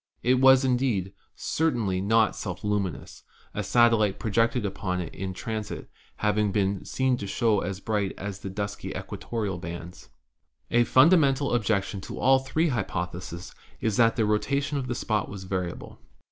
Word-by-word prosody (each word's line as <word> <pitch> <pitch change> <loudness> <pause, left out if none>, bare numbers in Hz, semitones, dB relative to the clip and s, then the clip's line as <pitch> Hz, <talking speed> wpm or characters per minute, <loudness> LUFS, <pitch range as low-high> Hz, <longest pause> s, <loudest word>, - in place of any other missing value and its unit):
It 125 +1 +3
was, 135 0 +7
indeed, 120 -7 0 0.2
certainly 115 -13 0
not 110 +3 +3
self 90 -3 -5
luminous, 105 -5 -2 0.3
a - - -2
satellite 115 -4 +3
pro 110 - -4
jected 115 +1 +2
upon 95 -2 -2
it 85 - -5
in 95 0 -4
transit 110 +3 -5 0.2
having 105 -1 +1
been 100 -1 0
seen 130 -1 +1
to 100 - -5
show 110 0 +2
as 95 -1 -4
bright 105 -2 -1
as 100 -1 -5
upon 100 - -6
the 95 - -11
dusky 100 -1 -4
equatorial 105 -6 -4
bands. 85 0 -8 0.6
"A 120 0 +4
fundamental 140 -2 +4
objection 100 -4 0
to - - -7
all 135 0 +4
three 145 +5 0
hypotheses 90 - -4 0.3
is 110 -3 0
that 115 -1 +4
the 110 - +2
rotation 140 +7 0
of 130 - -4
the 125 - -2
spot 110 -4 -1
was 100 -1 -7
variable. 90 -2 -4
105 Hz, 160 wpm, -26 LUFS, 95-125 Hz, 0.6 s, was